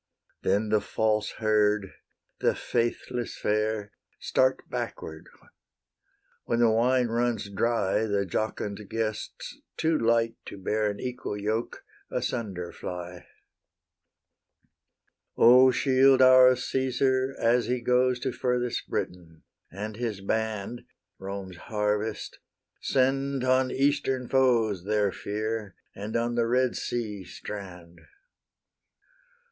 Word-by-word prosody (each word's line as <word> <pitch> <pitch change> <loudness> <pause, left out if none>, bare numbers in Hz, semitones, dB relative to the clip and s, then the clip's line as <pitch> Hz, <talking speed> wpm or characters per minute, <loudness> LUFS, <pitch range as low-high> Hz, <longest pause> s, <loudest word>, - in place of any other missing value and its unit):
Then 105 +3 +1
the 105 -1 +3
false 110 -1 0
herd, 105 -2 +1 0.5
the - - +2
faithless 120 +1 -2
fair, 105 -1 -1 0.3
Start 130 0 +1
backward; 80 0 -6 1.2
when 115 - 0
the 120 -1 +4
wine 125 +3 +3
runs 115 -3 -1
dry, 110 0 +1
The 100 -1 0
jocund 105 +1 -3
guests, 110 -1 -4 0.2
too 160 0 +1
light 115 0 +2
to - - -8
bear 105 +2 0
An 100 - -5
equal 125 -4 -4
yoke, 110 +3 -2 0.3
asunder 95 -8 -3
fly. 90 0 -7 2.1
O 125 +3 +8
shield 130 +1 +4
our 130 0 +8
Caesar 130 +1 0
as 120 +1 +2
he 125 0 0
goes 125 +1 +2
To 130 - -1
furthest 125 -1 -2
Britain, 85 -3 -5 0.3
and 105 +3 -6
his 115 -4 -3
band, 110 +2 -2 0.4
Rome's 95 -2 -6
harvest! 105 +2 -2 0.4
Send 135 0 +1
on 130 0 +3
Eastern 135 -2 0
foes 115 -8 +2
Their 105 -1 +1
fear, 105 0 -4 0.2
and 105 +2 -6
on 120 +1 0
the 120 -1 +1
Red 125 +1 +2
Sea 105 -5 -3
strand! 90 -3 -9
115 Hz, 110 wpm, -27 LUFS, 105-125 Hz, 2.1 s, O